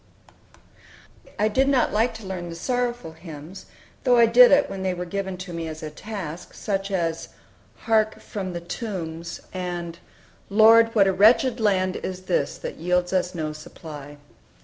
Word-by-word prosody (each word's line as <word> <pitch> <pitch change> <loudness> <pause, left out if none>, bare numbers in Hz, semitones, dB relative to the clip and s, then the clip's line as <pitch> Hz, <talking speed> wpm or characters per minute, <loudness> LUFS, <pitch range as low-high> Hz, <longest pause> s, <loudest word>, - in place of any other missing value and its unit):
I 210 - +2
did 260 +6 +2
not 270 -3 +2
like 225 +3 +1
to 225 -2 -9
learn 180 -2 -5
the 165 - -7
sorrowful 245 -1 -2
hymns, 160 +2 -11 0.4
though 250 -2 +4
I 235 - +7
did 245 +2 +7
it 285 0 +5
when 195 - -6
they 185 -1 -1
were 180 0 -4
given 190 +1 -4
to 180 -1 -8
me 165 -1 -4
as 155 0 -7
a 155 - -5
task, 180 -3 -7
such 195 -1 -2
as 170 -4 -2 0.5
"Hark, 220 -1 +1
from 190 -3 -5
the 170 - -5
tombs," 170 -4 -5
and 175 -2 -5 0.5
"Lord, 225 +2 +6
what 200 -3 +6
a 195 - +2
wretched 230 +5 +4
land 185 -4 +1
is 185 0 -6
this, 175 -6 -1
That - - -7
yields 180 +2 0
us 185 -1 0
no 155 -2 -3
supply." 150 -1 -10
185 Hz, 170 wpm, -24 LUFS, 170-220 Hz, 0.5 s, I